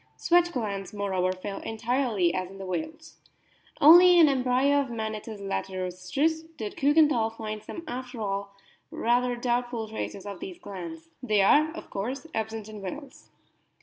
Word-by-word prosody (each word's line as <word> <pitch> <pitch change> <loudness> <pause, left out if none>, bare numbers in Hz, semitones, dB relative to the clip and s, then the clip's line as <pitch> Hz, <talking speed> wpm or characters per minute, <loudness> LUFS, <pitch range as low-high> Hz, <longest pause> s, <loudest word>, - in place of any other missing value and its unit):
Sweat 350 0 +3
glands, 205 - -4
moreover, 190 -3 0
fail 195 +2 -6
entirely, 225 -5 0
as 185 -1 -2
in 195 - -12
whales. 310 - -6 0.6
Only 350 +4 +9
in 330 -3 +8
an 275 -2 +2
embryo 260 +3 +3
of 275 - -4
Manatus 220 -1 -5
latirostris 195 - -2
did 215 -2 -5
Kiikenthal 280 -6 +3
find 215 -1 -5
some 335 - -8
after 250 -2 -6
all 200 -1 -3 0.3
rather 245 +1 +1
doubtful 240 -1 -1
traces 215 -2 -6
of 200 -3 -7
these 185 -2 -7
glands. 165 -4 -8
They 215 -5 +2
are, 300 +10 +5
of 330 - -10
course, 250 +9 -4
absent 220 -1 -3
in 215 -1 -9
whales. 265 +8 -8
225 Hz, 150 wpm, -27 LUFS, 195-270 Hz, 0.6 s, Only